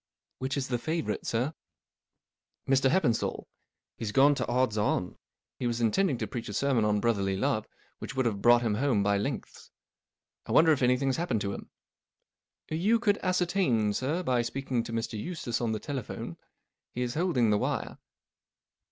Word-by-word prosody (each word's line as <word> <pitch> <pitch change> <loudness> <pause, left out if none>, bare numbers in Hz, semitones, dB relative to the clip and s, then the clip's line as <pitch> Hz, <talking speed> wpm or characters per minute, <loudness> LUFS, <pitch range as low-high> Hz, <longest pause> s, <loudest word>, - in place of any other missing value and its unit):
*' - - -56
Which 130 +2 -2
is 135 -1 -1
the 120 -2 0
favourite, 160 +5 -2
sir? 125 +7 0 0.4
" - - -61
" - - -55
Mr* 135 0 +4
HeppenstalJ, 125 -9 +1 0.5
He's 110 -2 -3
gone 140 +4 +5
to - - -2
odds 125 -3 +1
on* 105 -4 0 0.4
He 125 - -1
was 120 0 -1
intending 130 - +2
to - - -2
preach 120 -4 -6
a - - -5
sermon 130 -3 +2
on 105 0 +2
Brotherly 100 -4 0
Love 110 -1 0 0.3
which 130 - -7
would 130 -1 +1
have 105 -4 -1
brought 120 +1 +6
him 110 -3 +1
home 115 -2 +1
by 100 0 +2
lengths. - - -5 0.8
1 - - -1
wonder 160 0 +7
if 145 - +2
anything's 125 +1 +2
happened 130 -11 -1
to 100 0 -2
him." - - -8 1.0
M 155 - -1
You 215 +6 +4
could 210 -3 +1
ascertain, 175 - +1
sir, 150 - -1
by 125 -6 +2
speaking 125 +1 -2
to - - -6
Mr. 115 -1 -3
Eustace 125 -9 -3
ort 115 -2 0
the 110 - -2
telephone. 135 -2 -5 0.6
He 125 - -1
is 120 -1 -2
holding 150 -9 +2
the 105 - +3
wire." - - -2
125 Hz, 185 wpm, -29 LUFS, 110-145 Hz, 1.0 s, wonder